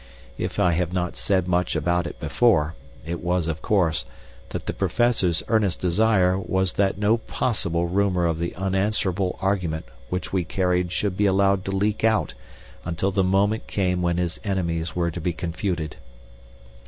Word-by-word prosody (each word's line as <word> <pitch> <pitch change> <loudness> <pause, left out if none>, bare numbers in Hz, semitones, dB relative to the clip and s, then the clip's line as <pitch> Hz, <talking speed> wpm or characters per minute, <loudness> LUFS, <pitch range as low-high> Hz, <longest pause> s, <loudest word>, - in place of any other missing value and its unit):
If - - -3
I 90 - +4
have 85 0 0
not 90 -1 -2
said 95 -2 +1
much 90 -1 +1
about 85 +2 +1
it - - -9
before, 85 -10 +2 0.3
it 85 +1 -4
was, 90 -1 +1
of 80 -1 -3
course, 85 -7 +1 0.5
that - - -5
the - - -2
Professor's 110 -9 +1
earnest 105 -6 +2
desire 95 0 +3
was 95 -1 0
that 100 -1 +1
no 105 +3 +3
possible 85 -8 -1
rumor 90 -1 +1
of 80 -1 0
the 85 0 -3
unanswerable 95 0 0
argument 90 -5 0 0.2
which 90 +1 -3
we 95 -2 +2
carried 90 0 0
should 90 +1 -1
be 105 +1 +2
allowed 100 0 +3
to 95 - -2
leak 100 +2 0
out 110 - +2 0.5
until 90 +3 -1
the 95 0 +2
moment 100 +4 +1
came 90 -2 0
when 85 -1 +1
his 85 -2 -2
enemies 85 -5 -2
were 85 -1 0
to 85 +1 -6
be 85 +2 -1
confuted. 85 -1 -3
90 Hz, 165 wpm, -24 LUFS, 85-100 Hz, 0.5 s, I